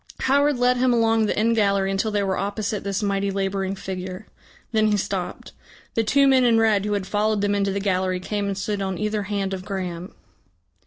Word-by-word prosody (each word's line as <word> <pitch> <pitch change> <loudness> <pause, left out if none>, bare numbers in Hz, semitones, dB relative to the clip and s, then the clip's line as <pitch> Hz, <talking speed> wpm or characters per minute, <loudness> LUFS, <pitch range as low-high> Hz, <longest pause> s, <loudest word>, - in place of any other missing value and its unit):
Howard 285 +1 +3
led 250 +1 +3
him 255 0 +3
along 225 -2 +3
the - - -1
end 230 +2 +2
gallery 200 -2 +2
until 195 +3 0
they 205 -1 0
were 190 -1 0
opposite 205 +2 -3
this 200 +1 -2
mighty 200 0 0
labouring 195 0 -2
figure. 185 0 -6 0.5
Then 220 -2 +3
he 210 -1 +2
stopped. 190 -2 -4 0.4
The 225 - +1
two 275 +6 +3
men 265 -1 +5
in 235 -2 +4
red 215 -3 +3
who 210 - -1
had 200 -2 -1
followed 210 +1 0
them 205 0 +1
into 200 -1 +1
the 200 - -2
gallery 185 -2 0
came 205 +2 -3
and 195 -1 -3
stood 200 +1 -2
on 190 -2 -2
either 210 +1 -1
hand 195 -2 -1
of 185 -1 -5
Graham. 185 -3 -5
200 Hz, 210 wpm, -23 LUFS, 195-220 Hz, 0.5 s, men